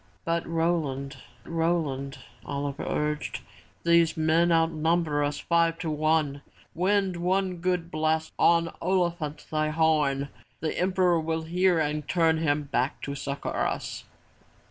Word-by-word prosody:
'' - - -37
"But 170 0 -1
Roland, 160 -5 -1 0.3
Roland,'' 160 -5 -1 0.3
Oliver 140 +2 -4
urged, 150 0 -2 0.4
"these 170 -1 +4
men 160 +2 +3
outnumber 165 -2 +2
us 145 0 -1
five 170 -1 +2
to 165 -2 -3
one! 155 -2 +1 0.3
Wind 190 +1 +1
one 185 +1 0
good 175 -1 -1
blast 155 +1 0
on 170 0 +4
Ol'i 180 -1 +2
phant, 150 -3 -6
thy 155 0 +1
horn. 150 -3 +1 0.3
The 155 - -2
Emperor 180 -2 +2
will 160 0 -2
hear 180 +2 +2
and 150 -1 -1
turn 165 -2 +2
him 150 -2 +1
back 135 -1 -1
to 140 - -3
succor 140 0 -4
us." - - -2
160 Hz, 135 wpm, -27 LUFS, 150-170 Hz, 0.4 s, these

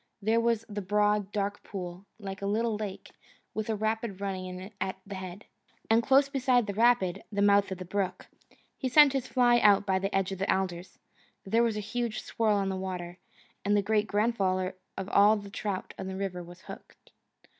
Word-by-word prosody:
There 220 +2 +2
was 230 -1 +1
the 205 -2 -4
broad, 205 +1 +1
dark 205 -1 -2
pool, 185 0 -7
like 195 -2 -7
a 200 - -2
little 220 +2 +1
lake, 205 -2 -6 0.4
with 215 0 -3
a 220 - +1
rapid 220 -1 -2
running 190 -2 -3
in 185 +2 -8
at 190 0 -2
the 200 - -8
head, 185 +1 -7 0.5
and 225 +1 +5
close 270 +3 +4
beside 255 -4 +2
the 200 - -3
rapid, 210 -4 +2
the 200 -1 +1
mouth 200 -1 +4
of 190 - -3
the 185 - -7
brook. 190 +1 -2 0.5
He 260 - -1
sent 290 +1 +7
his 265 -2 -1
fly 240 -1 +4
out 205 -2 +5
by 190 -1 +1
the 195 +1 -2
edge 195 0 +1
of 190 - -5
the 195 - +1
alders. 185 -2 -2 0.5
There 225 +4 +2
was 230 -2 +1
a - - -2
huge 230 +1 -3
swirl 220 -2 +1
on 195 -1 0
the 190 - -2
water, 180 -2 -5 0.4
and 205 +1 +2
the 200 - +2
great 215 +1 +1
grandfather 195 -4 0 0.2
of 195 - -4
all 205 +2 +6
the 200 -1 -9
trout 200 -2 -4
in - - -4
the 190 - -5
river 190 -2 -3
was 175 +1 -12
hooked. - - -13
200 Hz, 205 wpm, -29 LUFS, 190-220 Hz, 0.5 s, sent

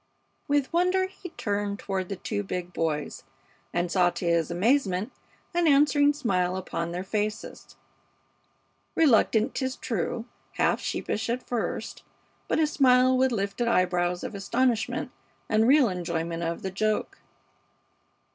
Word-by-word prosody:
With 285 +1 +1
wonder 365 +2 +2
he 375 -1 -10
turned 205 -7 -2
toward 190 -2 -3
the 200 - -3
two 205 +2 -3
big 180 -3 -5
boys, 155 -2 -2 0.5
and 175 0 -1
saw, 180 -2 +4
to 175 - -5
his 170 -2 +2
amazement, 200 +2 +1 0.4
an 345 -1 +2
answering 290 0 +5
smile 185 -10 0
upon 170 -2 -4
their 180 +1 -4
faces; 210 +2 -4 1.2
reluctant, 235 -4 +3
'tis 260 -1 -2
true, 230 +1 -3 0.3
half - - +1
sheepish 220 +2 -3
at 245 +2 -2
first, 240 -2 -3 0.5
but - - 0
a 315 - +4
smile 255 -3 +4
with 260 0 +3
lifted 200 +2 -1
eyebrows 180 -4 +1
of - - -5
astonishment 230 +3 0 0.4
and 220 +1 +3
real 275 -1 +6
enjoyment 170 -3 -3
of 170 0 -3
the 190 - -3
joke. 215 +3 -1
210 Hz, 135 wpm, -27 LUFS, 180-260 Hz, 1.2 s, real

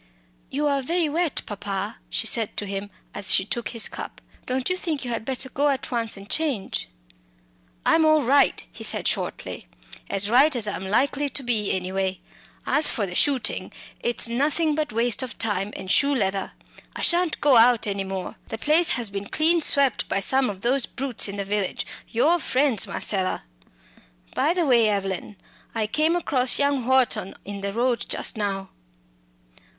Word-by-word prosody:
"You 290 +2 -2
are 280 -1 +1
very 330 +3 0
wet, 330 0 -1
papa," 205 0 -5
she - - 0
said 225 -1 0
to 205 - -2
him 200 +1 -5 0.2
as 200 -2 +2
she 190 - +3
took 235 +2 -3
his 230 -2 +2
cup; - - -8 0.3
"don't 255 0 -1
you 365 - +1
think 315 -7 -3
you 245 - -4
had 230 - -3
better 265 0 -1
go 285 +3 0
at 275 -1 -3
once 230 -4 0
and 195 +1 -11
change?" 280 -8 -1 1.0
"I'm 325 - +4
all 310 -1 +4
right," 275 +3 +3
he - - -11
said - - +3
shortly - - -4 0.4
"as 200 0 +1
right 265 +6 +4
as 225 -3 +3
I'm 190 -2 -4
likely 280 +7 +1
to 275 - -2
be, 220 -5 0
anyway. 190 0 -2 0.5
As 295 +1 +5
for 215 - -1
the 180 - -7
shooting, 270 +5 0 0.3
it's 240 0 +2
nothing 295 +6 0
but 300 -3 -2
waste 230 +1 +1
of 255 -2 -6
time 205 -3 -1
and 190 - -5
shoe 280 0 +3
leather. 195 -4 -1 0.4
I - - -4
shan't 350 -1 +3
go 280 -4 +5
out 235 0 +5
any 200 -1 -2
more. 190 -1 -6
The 225 - -5
place 310 +7 +3
has 230 -4 0
been 200 0 -5
clean 330 +2 +3
swept 280 -5 +3
by - - 0
some 260 +6 +3
of 195 -2 -7
those 255 +1 +1
brutes 260 -5 -2
in 200 - -6
the 200 -1 -4
village 200 -1 -2 0.2
your 315 +10 +2
friends, 265 -6 +1
Marcella. 190 -3 -1 0.9
By 335 - +1
the 350 -2 +1
way, 235 -5 +4
Evelyn, 195 0 -3 0.4
I 220 -1 0
came 310 +9 +1
across 260 -7 +1
young 280 -4 0
Wharton 260 -7 +2
in 200 0 -6
the 200 0 -3
road 240 +3 -1
just - - -1
now." 195 -2 -3
240 Hz, 180 wpm, -24 LUFS, 200-285 Hz, 1.0 s, As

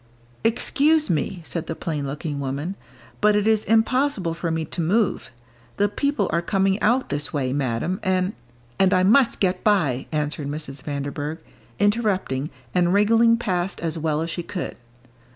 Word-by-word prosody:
"Excuse 295 - +2
me," 170 +2 -2
said 170 0 -4
the 160 - -3
plain 150 -5 -3
looking 145 +1 -4
woman, 140 +6 -3 0.5
"but 210 -1 +4
it 210 0 +2
is 220 -1 +3
impossible 225 - +2
for 170 0 -3
me 160 0 -1
to 170 - -4
move; 195 - +1 0.5
the 205 - +3
people 220 0 0
are 170 - +2
coming 195 +2 +1
out 245 +4 +2
this 145 +1 -1
way, 130 -3 -1
Madam, 140 +6 -1
and 185 +1 0 0.2
" 120 0 -31
"And 190 -1 +4
I 185 - +3
must 230 +6 +4
get 185 -1 0
by," 155 - +2
answered 150 -1 -2
Mrs. 145 -2 -5
Vanderburgh, 145 +1 -4 0.4
interrupting, 200 - +1 0.2
and 175 -1 +3
wriggling 230 +3 +5
past 190 -4 -2
as 165 -1 -2
well 155 -1 -1
as 165 +1 -3
she 175 - -3
could. 180 +1 -5
175 Hz, 165 wpm, -23 LUFS, 150-210 Hz, 0.5 s, wriggling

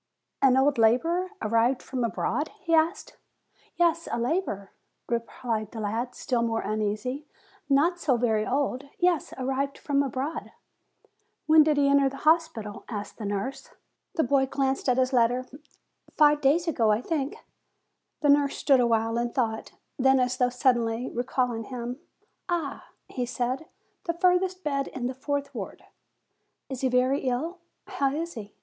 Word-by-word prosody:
"An 265 -1 +5
old 270 -1 +3
laborer, 330 +12 +3
arrived 230 +4 +2
from 255 -2 -3
abroad?" 235 - -1
he 335 -3 -1
asked. 325 +4 +1 0.6
"Yes, 335 -1 +2
a - - 0
laborer," 235 - -2 0.4
replied 230 -2 -2
the 225 - -8
lad, 225 +4 -2
still 245 -3 -1
more 225 -1 0
uneasy; 215 +7 -2 0.4
"not 325 +6 +3
so 270 -7 +2
very 220 -3 +1
old. 270 +1 -1
Yes, 355 -3 +1
arrived 270 +1 -2
from 280 -1 +1
abroad." 275 +3 -3 0.9
"When 315 0 +7
did 300 -1 +3
he 285 -1 +4
enter 280 -1 +4
the 275 - -9
hospital?'" 310 -11 +1
asked 210 -1 -6
the 210 - -3
nurse. 205 +6 -4 0.4
The 320 - +2
lacl 265 +1 +2
glanced 270 -1 0
at 250 - +3
his 260 +1 +2
letter; 245 +1 +3 0.7
"Five 295 -1 +5
days 310 +5 +3
ago, 235 -9 +2
I 210 - +2
think." 290 -4 -2 0.9
The 295 - +2
nurse 285 -1 +4
stood 275 -3 +4
awhile 230 -1 +2
in 240 0 -2
thought; 225 -4 -2 0.3
then, 265 0 +5
as 250 0 +1
though 250 -1 +3
suddenly 245 -1 +1
recalling 245 -2 -1
him; 250 +1 -5 0.5
"Ah!" 330 -5 -2 0.2
he 250 -2 -3
said, 255 +5 -2 0.4
"the 335 - 0
furthest 365 +1 +2
bed 275 -2 -1
in 255 -2 -5
the 255 - -1
fourth 280 +1 -3
ward." 210 -6 -7 0.9
"Is 265 -2 -5
he 260 - +2
very 255 +3 +2
ill? 285 +8 -2 0.3
How 275 -1 0
is 335 +2 -3
he?" 210 -3 -9
260 Hz, 155 wpm, -27 LUFS, 235-295 Hz, 0.9 s, When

